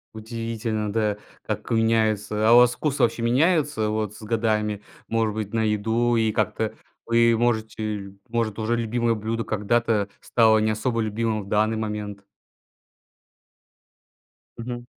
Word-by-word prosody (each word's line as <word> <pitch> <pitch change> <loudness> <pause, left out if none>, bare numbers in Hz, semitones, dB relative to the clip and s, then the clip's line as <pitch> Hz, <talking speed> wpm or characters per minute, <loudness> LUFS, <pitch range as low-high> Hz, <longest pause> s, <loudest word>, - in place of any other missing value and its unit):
Удивительно, 110 -1 -3
да, 105 -1 0 0.3
как - - -4
меняется. 110 -2 +1
А - - +7
у - - +9
вас 125 0 +6
вкус 145 -2 -2
вообще 120 -1 +2
меняется 140 -2 +2
вот 105 -1 -2
с 105 - -13
годами, 105 -2 -1 0.3
может 115 -2 0
быть, 105 0 -5
на 110 -1 +1
еду? 110 +3 +1
И 110 -1 +2
как-то - - -1 0.3
вы, 115 0 +4
может, 110 -2 0
э, 105 -2 -4 0.2
может, 115 -2 -2
уже 110 +2 0
любимое 115 0 0
блюдо 110 +1 -3
когда-то 110 -1 0
стало 110 -2 +3
не 110 0 +2
особо 115 +2 -1
любимым 110 0 -1
в - - -13
данный 110 +2 +1
момент? 105 -2 -5 2.3
Мгм. 120 +1 -6
110 Hz, 140 wpm, -24 LUFS, 105-115 Hz, 2.3 s, у